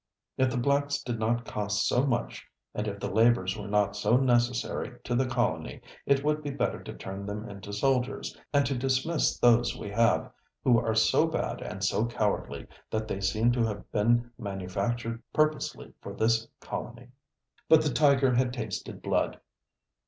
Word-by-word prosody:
If 130 -1 +2
the 125 - -2
blacks 140 +2 +1
did 120 -3 -3
not 120 +2 0
cost 105 -1 -1
so 130 +3 +2
much, 120 -3 -2 0.3
and 105 - -3
if 100 -1 -4
their - - -3
labors 110 -3 +3
were 105 -1 -7
not 100 -1 +1
so 110 +3 +3
necessary 120 -1 0
to 120 - -3
the 130 +2 +2
colony, 120 - -1 0.3
it 140 0 +3
would 150 +1 +1
be 145 - -4
better 140 - -2
to - - -8
turn 95 +1 -7
them 105 +2 -5
into 100 0 -9
soldiers, 130 +4 0 0.2
and 140 -1 +3
to 135 +1 -1
dismiss 135 +5 +1
those 120 0 +4
we 105 - -6
have, 115 +2 +2 0.3
who 120 -3 +5
are 110 -1 -1
so 110 +8 +4
bad 160 - -2
and 95 -1 -6
so 105 +3 +1
cowardly 105 -3 -2 0.2
that 110 0 -2
they 100 - -3
seem 110 +5 +2
to 120 -1 +1
have 105 -2 -6
been 120 +3 +2
manufactured 110 +4 -3
purposely 155 -1 0
for - - -7
this 115 0 +2
colony." 120 +1 -7 0.6
But 160 -1 +7
the 150 -4 0
tiger 140 -3 +4
had 125 0 +1
tasted 110 -6 -5
blood. - - 0
120 Hz, 175 wpm, -28 LUFS, 105-130 Hz, 0.6 s, But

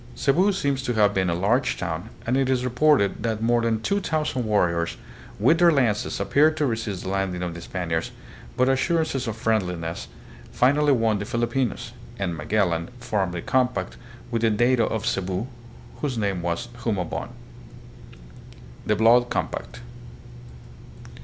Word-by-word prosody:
Cebu 175 +9 +3
seems 140 -8 -1
to 125 -2 -2
have 105 -1 +4
been 95 -2 +1
a 85 - 0
large 120 +9 +1
town 85 -2 -4 0.2
and 125 - +1
it 135 -1 +1
is 125 -1 +1
reported 125 -4 +2
that 110 -2 -1
more 120 +1 +2
than 115 -1 0
two 200 - +1
thousand 150 -8 -1
warriors 85 -6 +1 0.4
with 130 +10 +4
their 175 -1 +6
lances 120 -8 +1
appeared 150 +10 +3
to 150 - +1
resist 110 -6 -3
the 95 - -4
landing 95 -2 -1
of 85 -2 -3
the 85 - -8
Spaniards, 85 -2 -3 0.5
but 125 - +3
assur 160 +5 +2
ances 135 -5 -3
of 115 0 -3
friendliness 90 - -1 0.4
finally 145 +3 +3
won 115 -5 +2
the 100 - -4
Filipinos, 120 +2 -1 0.3
and 90 -4 -2
Magellan 85 0 0
formed 100 -7 -1
a 85 - -4
compact 125 -1 0 0.4
with 115 -1 0
the 115 - +3
dato 120 +2 +2
of 110 -1 -3
Cebu, 95 -2 -1 0.5
whose 140 -5 -3
name 100 -4 -1
was 85 +8 -3
Humabon. 100 -8 -2 1.6
The 105 - +3
Blood 120 +3 +4
Compact. - - -4
115 Hz, 155 wpm, -24 LUFS, 95-130 Hz, 1.6 s, their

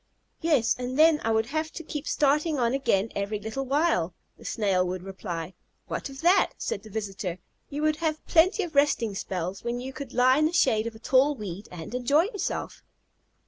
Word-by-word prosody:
"Yes, 290 -9 +3
and 250 +1 -3
then 315 -1 +5
I 225 - 0
would 220 0 +2
have 310 +5 -2
to 330 - -7
keep 300 -1 -5
starting 300 +2 +2
on 240 -1 +1
again 225 -6 +1
every 200 +1 -2
little 220 +6 -4
while," 270 - +1 0.2
the - - -17
Snail 195 -4 +1
would 180 0 -4
reply. 185 -3 -5 0.3
"What - - -4
of 270 0 -9
that?" 355 +4 +4
said 200 - -3
the 215 - -13
visitor; 195 -4 -4 0.3
"you 295 +1 -3
would 310 0 +2
have 310 -1 -2
plenty 370 +5 +4
of 340 -2 -6
resting 280 -7 +2
spells, 185 -1 -4
when 240 +1 -2
you 260 +2 -6
could 275 -2 -7
lie 255 +2 +4
in 310 - +4
the 330 - -5
shade 230 -9 +3
of 230 - -6
a - - -9
tall 270 +5 +3
weed 205 -3 -7
and 170 +3 -8
enjoy 280 +6 +3
yourself." 405 0 -4
250 Hz, 200 wpm, -27 LUFS, 205-300 Hz, 0.3 s, then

